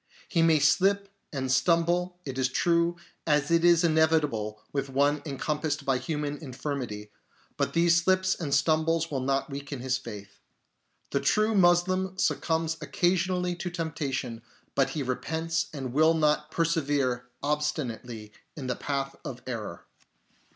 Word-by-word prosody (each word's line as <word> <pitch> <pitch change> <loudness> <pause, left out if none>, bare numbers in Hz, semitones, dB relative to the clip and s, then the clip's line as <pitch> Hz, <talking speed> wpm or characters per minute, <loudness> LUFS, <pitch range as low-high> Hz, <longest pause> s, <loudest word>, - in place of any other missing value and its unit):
He 170 - +1
may 165 -1 +5
slip 195 +7 +3 0.2
and 130 -3 -2
stumble, 170 +5 +2
it 135 -2 -4
is 130 -1 +2
true, 170 +4 +2 0.3
as 150 0 +2
is 170 0 +5
inevitable 155 -10 +2
with 140 -1 -2
one 140 +2 +2
encompassed 150 +1 -2
by 135 -2 +2
human 150 -1 -3
infirmity, 130 -7 -5 0.4
but - - -1
these 170 0 +4
slips 185 +1 +2
and 155 -5 -4
stumbles 160 +2 +2
will 135 - -1
not 135 +2 -1
weaken 140 0 -6
his 130 0 0
faith. 100 -1 -10 0.7
The 140 - +1
true 215 +10 +2
Moslem 185 0 +3
succumbs 160 -3 0
occasionally 180 +4 +1
to 180 - -3
temptation, 145 -8 -3 0.3
but 135 -1 +2
he 150 - -3
repents 160 +5 -2
and 130 -5 -5
will 160 +3 +4
not 150 -1 +2
persevere 145 -7 0 0.2
obstinately 125 -7 -3 0.2
in 140 - -5
the 125 -1 -1
path 135 -1 -3
of 125 - -7
error. 110 -9 -6
150 Hz, 135 wpm, -28 LUFS, 135-170 Hz, 0.7 s, may